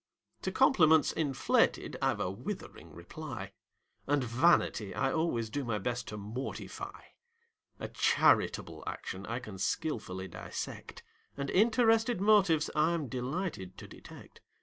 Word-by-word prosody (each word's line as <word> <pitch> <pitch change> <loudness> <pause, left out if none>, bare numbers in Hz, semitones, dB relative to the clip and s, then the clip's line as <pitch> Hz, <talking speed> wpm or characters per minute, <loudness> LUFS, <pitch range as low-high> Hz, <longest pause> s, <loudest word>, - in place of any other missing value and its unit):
To - - -2
compliments 160 - +5
inflated 145 -5 +1
I've - - +1
a 90 - -1
withering 115 - -7
reply; 100 - -8 0.6
And 145 -1 +2
vanity 120 - +2
I 135 -1 +1
always 120 -9 0
do 145 +3 -2
my 115 -4 -1
best 120 +4 -3
to 105 - -6
mortify; 110 +6 -6 0.8
A - - -4
charitable - - +2
action 95 +2 -5
I 115 - -2
can 110 -6 -8
skilfully 95 -7 -2
dissect: 85 - -7 0.3
And 140 -1 -3
interested 225 +1 +3
motives 195 -7 +4
I'm 155 -2 +1
delighted 130 - -4
to - - -9
detect. - - -14
135 Hz, 125 wpm, -31 LUFS, 110-165 Hz, 0.8 s, compliments